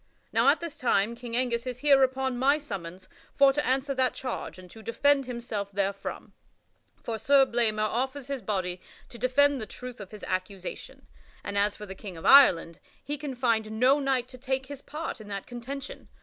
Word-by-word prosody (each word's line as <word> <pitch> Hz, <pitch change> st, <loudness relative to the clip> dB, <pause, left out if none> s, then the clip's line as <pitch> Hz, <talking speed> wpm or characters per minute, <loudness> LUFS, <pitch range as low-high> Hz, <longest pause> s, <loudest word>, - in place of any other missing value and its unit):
Now -, -, +3 dB
at -, -, +3 dB
this 335 Hz, -3 st, -7 dB
time 230 Hz, -3 st, +2 dB
King 235 Hz, -1 st, -7 dB
Angus 245 Hz, -1 st, 0 dB
is 250 Hz, -1 st, -3 dB
here 275 Hz, 0 st, +5 dB
upon 260 Hz, 0 st, +1 dB
my 280 Hz, +3 st, +4 dB
summons 185 Hz, -, -7 dB, 0.3 s
for 275 Hz, -1 st, +6 dB
to 295 Hz, +1 st, 0 dB
answer 265 Hz, +2 st, 0 dB
that 260 Hz, -1 st, +1 dB
charge 255 Hz, -6 st, -5 dB
and 185 Hz, 0 st, -12 dB
to 225 Hz, -, -12 dB
defend 275 Hz, +4 st, +2 dB
himself 235 Hz, -5 st, -4 dB
therefrom; 195 Hz, 0 st, -3 dB, 0.7 s
for 225 Hz, -2 st, -3 dB
Sir 275 Hz, +2 st, +5 dB
Blamor 225 Hz, -4 st, +1 dB
offers 260 Hz, +4 st, -2 dB
his 275 Hz, -1 st, -4 dB
body 185 Hz, -4 st, -2 dB, 0.3 s
to 235 Hz, -, -11 dB
defend 275 Hz, +2 st, +3 dB
the 215 Hz, -, -5 dB
truth 250 Hz, +3 st, -9 dB
of 195 Hz, -, -9 dB
his 210 Hz, -1 st, -11 dB
accusation, 185 Hz, 0 st, -5 dB, 0.4 s
and 200 Hz, -, -5 dB
as 200 Hz, +1 st, +2 dB
for 210 Hz, -, -8 dB
the 190 Hz, -, -7 dB
King 190 Hz, -2 st, -9 dB
of 165 Hz, -, -9 dB
Ireland, 180 Hz, -, +6 dB, 0.2 s
he 290 Hz, +2 st, -3 dB
can 290 Hz, -3 st, -6 dB
find 220 Hz, -3 st, 0 dB
no 265 Hz, +4 st, +5 dB
knight 265 Hz, -3 st, 0 dB
to 255 Hz, -, -12 dB
take 265 Hz, +1 st, -2 dB
his 280 Hz, 0 st, -8 dB
part 300 Hz, -6 st, -6 dB
in 210 Hz, -, -11 dB
that 200 Hz, -1 st, -5 dB
contention. 260 Hz, +3 st, -7 dB
245 Hz, 195 wpm, -28 LUFS, 210-270 Hz, 0.7 s, for